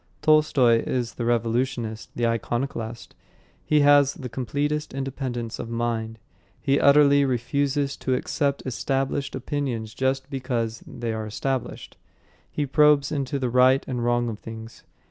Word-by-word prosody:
Tolstoy, 145 -6 +4
is 120 -2 -2
the 120 - -4
revolutionist, 115 -1 -1
the 120 - 0
iconoclast. 115 0 -3 0.5
He 150 -1 +3
has 145 -1 +5
the 125 - -7
completest 145 +5 -2
independence 130 -4 -4
of 115 - -5
mind. 115 -1 -2 0.4
He 140 +1 +1
utterly 140 0 +6
refuses 140 +2 0
to 130 - -1
accept 140 +2 -1
established 135 +2 -2
opinions 125 -5 -3
just 130 0 -1
because 120 -4 -3
they 120 -2 -4
are 110 -1 -4
established. 130 +4 -4 0.5
He 145 - -2
probes 145 0 +4
into 140 -1 -2
the 130 -3 -2
right 130 +2 +4
and 125 -2 -3
wrong 120 0 +1
of 110 -2 -5
things. 115 0 -10
130 Hz, 135 wpm, -24 LUFS, 115-140 Hz, 0.5 s, utterly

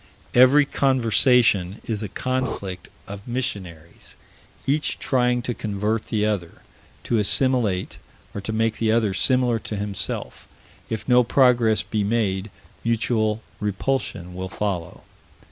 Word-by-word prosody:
Every 130 +4 +6
conversation 120 -7 +2
is 110 -2 -2
a 105 - -4
conflict 130 -7 -3 0.2
of 100 +2 -9
missionaries, 95 -10 -6 0.5
each 150 +2 0
trying 125 -2 +1
to 120 - -2
convert 105 +1 -2
the 105 -1 0
other, 100 -6 -3 0.4
to 115 - 0
assimilate, 110 -3 +3 0.3
or 100 - -5
to 110 - -4
make 110 0 0
the 110 -1 +2
other 110 -3 +1
similar 125 +3 +2
to 110 - -5
himself. 100 -1 -4 0.4
If 110 -1 -4
no 125 -1 +5
progress 120 -3 +3
be 105 -2 -2
made, 100 -2 -1 0.3
mutual 110 -1 0 0.2
repulsion 105 -3 -2
will 95 +1 -5
follow. 90 -5 -4
110 Hz, 125 wpm, -23 LUFS, 100-125 Hz, 0.5 s, Every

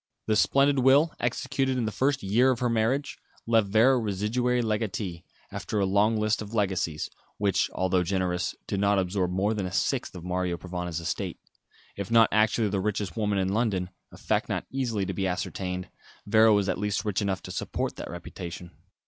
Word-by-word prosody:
The 110 - +1
splendid 140 +4 +3
will, 140 +5 +5
executed 130 +2 -1
in 120 - 0
the 110 - -2
first 135 +3 0
year 115 +7 +3
of 130 - +2
her 125 0 0
marriage, 115 +6 0 0.3
left 115 -3 +3
Vera 115 +6 +4
residuary 115 +4 0
legatee, 105 -5 -2 0.3
after 105 - -3
a 100 - +2
long 105 +3 +3
list 110 +1 +1
of 105 +2 -7
legacies, 95 -7 0 0.3
which 100 -2 +1
although 95 0 +2
generous, 90 -1 -1
did 100 - -2
not 100 0 +3
absorb 95 -1 0
more 95 +4 0
than 100 -4 -2
a - - -6
sixth 95 - -1
of 90 - -8
Mario 90 -1 -1
Provana's 90 -2 -4
estate. 85 0 -3 0.6
If 100 -1 -5
not 115 -1 +6
actually 110 0 +2
the 95 -1 -1
richest 105 -1 -2
woman 105 -3 0
in 95 -1 +1
London 100 -5 0 0.2
a - - -13
fact - - -1
not - - -2
easily 120 -7 -1
to 95 - -3
be 95 +1 -1
ascertained 90 0 -3 0.4
Vera 110 +2 +5
was 100 -2 +3
at - - -1
least 105 0 -1
rich 105 -1 0
enough 95 -2 -2
to - - -7
support - - -3
that - - -6
reputation. 85 0 -8
105 Hz, 190 wpm, -27 LUFS, 95-115 Hz, 0.6 s, not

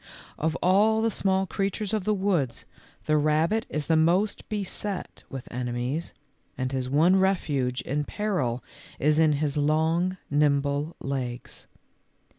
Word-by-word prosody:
Of 160 +1 -1
all 215 +4 +4
the 225 - +2
small 190 -1 +1
creatures 195 +3 -2
of 210 -4 -1
the 215 - +2
woods 175 - 0 0.4
the 155 - +3
rabbit 155 +9 +2
is 150 -1 -2
the 160 - +2
most 175 +6 +2
beset 205 -1 -3
with 135 -3 -7
enemies, 125 +5 -3 0.4
and 130 0 -2
his 130 -1 -2
one 165 +7 +4
refuge 145 -10 +1
in 145 +2 -2
peril 160 - -1 0.3
is 150 +2 +2
in 155 -2 +5
his 145 0 -1
long, 160 +5 +1
nimble 145 +1 +1
legs. 130 -3 -5
155 Hz, 135 wpm, -26 LUFS, 140-190 Hz, 0.4 s, in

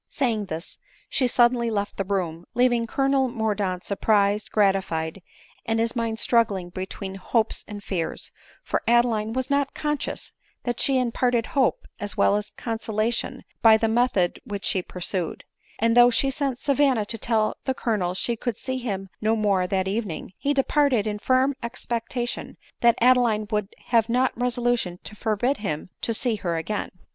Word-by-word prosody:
Saying 230 -7 0
this, 165 -1 -7 0.3
she 255 - +2
suddenly 240 -1 +3
left 205 -2 -2
the 195 - 0
room, 180 -4 -2
leaving 240 -2 +3
Colonel 270 +1 +2
Mordaunt 210 -6 -1
surprised, 205 0 +1
gratified, 190 -4 +1 0.4
and 225 0 0
his 230 +2 0
mind 230 -1 -1
struggling 205 -7 +1
between 190 +1 -5
hopes 220 +4 -1
and 205 -1 -8
fears; 175 -5 -3 0.3
for - - -1
Adeline 230 -2 +3
was 260 +2 -2
not 280 -1 +1
conscious 295 -1 -3 0.3
that 240 -1 -2
she 270 -1 +3
imparted 245 -1 +1
hope 270 -4 +2
as 205 0 -4
well - - +4
as 210 0 -2
consolation 225 0 -2 0.2
by 220 -1 +7
the 225 - +1
method 220 -6 +1
which 200 -1 -5
she 185 - +1
pursued; 180 -1 -4 0.3
and 230 +1 +2
though 245 0 +8
she 270 +3 +2
sent 275 -3 -1
Savanna 270 -5 +2
to 225 +2 -3
tell 220 -1 +1
the 265 - 0
Colonel 195 -8 -1
she 235 +5 0
could 235 -1 -3
see 260 0 -3
him 195 -6 -3
no 220 +1 +2
more 200 -4 +2
that 190 0 0
eve 210 +3 -1
ning, 175 +2 -7
be 285 - +2
departed 275 -4 +2
in 210 -1 -2
firm 260 +4 +3
expectation 240 0 -4 0.2
that 235 -1 +4
Adeline 240 -4 +4
would 210 -2 0 0.4
not 250 +2 +2
have - - -34
resolution 245 -7 0
to 210 - -9
forbid 225 +6 0
him 180 -4 -4
to - - -1
see 230 0 0
her 170 -4 -2
again. 205 +6 -3
225 Hz, 165 wpm, -25 LUFS, 200-245 Hz, 0.4 s, though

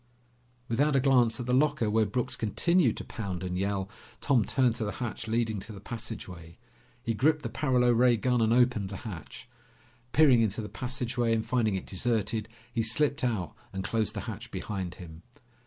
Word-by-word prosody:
Without 140 +5 +2
a - - +5
glance 130 -3 +3
at 125 - -3
the 125 - 0
locker 140 -3 +2
where 110 0 +2
Brooks 125 +4 -1
continued 130 - +2
to - - -5
pound 95 -5 -5
and 90 -1 -3
yell, 95 +1 -1 0.3
Tom 130 -6 +3
turned 125 +1 +2
to 115 - -2
the 105 -2 -3
hatch 120 -1 -5
leading 110 -2 0
to 105 - -9
the 100 - -9
passageway. 95 -7 -7 0.5
He 115 - 0
gripped 150 +7 +2
the 115 - -3
paralo 125 0 +2
ray 120 0 +4
gun 125 +2 +1
and 110 0 +3
opened 120 -5 +3
the 95 - -6
hatch. 95 -7 -8 0.6
Peering 140 -6 +6
into 110 -1 0
the 105 - -6
passageway 120 0 -1
and 110 - -1
finding 115 -5 +1
it 95 - -4
deserted, 110 +1 -1 0.2
he 115 - +1
slipped 140 +6 +1
out 110 -9 -1 0.2
and 95 0 -4
closed 110 +2 -1
the 100 - -3
hatch 110 +1 -7
behind 95 -6 -4
him. 80 -3 -11
115 Hz, 190 wpm, -29 LUFS, 100-125 Hz, 0.6 s, Peering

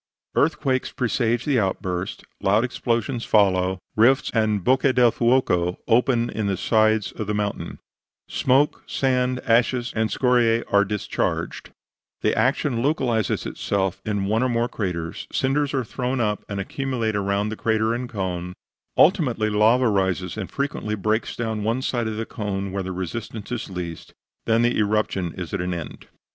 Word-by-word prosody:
Earthquakes 140 -4 +1
presage 120 -1 0
the 140 -4 +2
outburst, 95 -2 -2 0.2
loud 105 +4 +3
explosions 120 -1 -1
follow, 95 -3 +3 0.2
rifts 125 +5 +4
and 110 -4 +1
bocche 130 +2 +3
del 120 -2 +5
fuoco 105 -9 +2
open 120 0 +3
in 110 -2 -2
the 95 -2 0
sides 110 0 +2
of 110 - -5
the 105 - -1
mountain; 105 -1 -3 0.5
smoke, 135 +3 +2
sand, 125 -1 +1
ashes 120 +1 +1
and 110 0 +1
scoriae 120 -2 +2
are 100 0 +6
discharged, 105 +1 -2 0.5
the - - +1
action 130 -2 +1
localizes 120 - 0
itself 95 -2 -2
in 105 -2 -1
one 110 +4 +1
or 130 - +2
more 120 0 +1
craters, 90 -8 -4
cinders 140 +1 +1
are 135 -2 0
thrown 125 +3 -2
up 105 -3 0
and 100 -1 -3
accumulate 120 0 -2
around 100 +1 0
the 110 - -4
crater 110 0 +1
and 120 +1 -4
cone, 90 -5 -3 0.4
ultimately 125 - +3
lava 115 +5 +4
rises 95 -3 0
and - - -5
frequently 140 -6 -2
breaks 110 +3 -1
down 110 -2 -2
one 115 +5 -1
side 120 -3 -1
of 110 -1 -3
the 115 - -2
cone 100 -3 -4
where 100 0 -2
the 95 0 -4
resistance 100 +4 -5
is 120 -3 -3
least; 90 -3 -7 0.3
then 115 +1 +3
the 120 -1 +2
eruption 105 -4 0
is 90 -5 -6
at - - -1
an 90 0 -2
end. 85 -3 -8
110 Hz, 160 wpm, -23 LUFS, 100-125 Hz, 0.5 s, are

